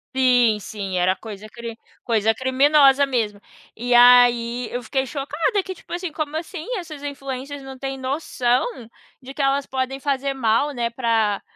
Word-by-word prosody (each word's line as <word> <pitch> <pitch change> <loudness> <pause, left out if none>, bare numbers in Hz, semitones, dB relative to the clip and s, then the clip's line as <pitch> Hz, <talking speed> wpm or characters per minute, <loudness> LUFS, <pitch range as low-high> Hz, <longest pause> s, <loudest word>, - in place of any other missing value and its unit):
Sim, 245 -4 +4
sim, 200 -2 -6
era 185 +1 +2
coisa 215 0 -10
cri 235 0 -8 0.3
coisa 225 -1 +1
criminosa 275 +2 +4
mesmo. 225 -7 -1 0.3
E 245 +2 0
aí 245 0 +5
eu 245 0 -4
fiquei 265 +1 -1
chocada 300 - -1
que 375 - -6
tipo 360 - -18
assim, 350 -1 -3
como 310 0 -3
assim 325 0 -7
essas 320 -6 -8
influencers 275 0 -6
não 265 -1 -10
têm 270 0 -4
noção, 260 -2 0 0.6
de 270 0 -10
que 290 - -4
elas 275 0 +1
podem 265 0 -3
fazer 275 -1 -1
mal, 235 +2 +2
né, 240 -3 -2
pra, 225 -4 0
260 Hz, 160 wpm, -22 LUFS, 235-280 Hz, 0.6 s, aí